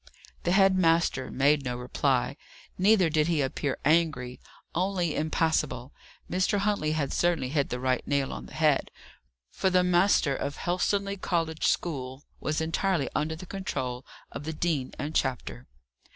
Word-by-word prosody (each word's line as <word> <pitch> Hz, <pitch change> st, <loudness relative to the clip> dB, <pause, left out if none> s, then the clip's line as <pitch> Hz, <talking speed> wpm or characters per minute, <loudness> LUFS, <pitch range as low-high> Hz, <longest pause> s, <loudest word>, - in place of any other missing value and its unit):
The 175 Hz, -, +2 dB
head 195 Hz, 0 st, +5 dB
master 165 Hz, -6 st, +2 dB
made 140 Hz, +2 st, +2 dB
no 125 Hz, -2 st, -3 dB
reply. 125 Hz, +1 st, 0 dB, 0.4 s
Neither 195 Hz, -1 st, +4 dB
did 155 Hz, -1 st, +2 dB
he 165 Hz, -3 st, +1 dB
appear 135 Hz, +1 st, -2 dB
angry; 150 Hz, -6 st, +1 dB, 0.3 s
only 180 Hz, -2 st, 0 dB
impassible. 150 Hz, -4 st, 0 dB, 0.3 s
Mr. 185 Hz, +3 st, +1 dB
Huntley 200 Hz, -7 st, 0 dB
had 145 Hz, -3 st, -1 dB
certainly 170 Hz, -7 st, +1 dB
hit 140 Hz, 0 st, 0 dB
the 125 Hz, -, -3 dB
right 130 Hz, 0 st, +1 dB
nail 140 Hz, -2 st, 0 dB
on -, -, -7 dB
the -, -, -13 dB
head; 155 Hz, -3 st, +2 dB, 0.6 s
for 190 Hz, -, 0 dB
the 180 Hz, -1 st, +3 dB
master 175 Hz, -5 st, +3 dB
of 145 Hz, -, -3 dB
Helstonleigh 200 Hz, +3 st, 0 dB
College 165 Hz, -2 st, 0 dB
school 135 Hz, -4 st, -2 dB, 0.2 s
was 155 Hz, +1 st, -1 dB
entirely 165 Hz, -1 st, 0 dB
under 155 Hz, +1 st, -1 dB
the 170 Hz, -, -9 dB
control, 135 Hz, -10 st, -4 dB, 0.3 s
of -, -, -7 dB
the 160 Hz, +2 st, -4 dB
Dean 155 Hz, -5 st, -1 dB
and 145 Hz, +3 st, -4 dB
Chapter. 130 Hz, -2 st, -2 dB
155 Hz, 150 wpm, -28 LUFS, 135-175 Hz, 0.6 s, head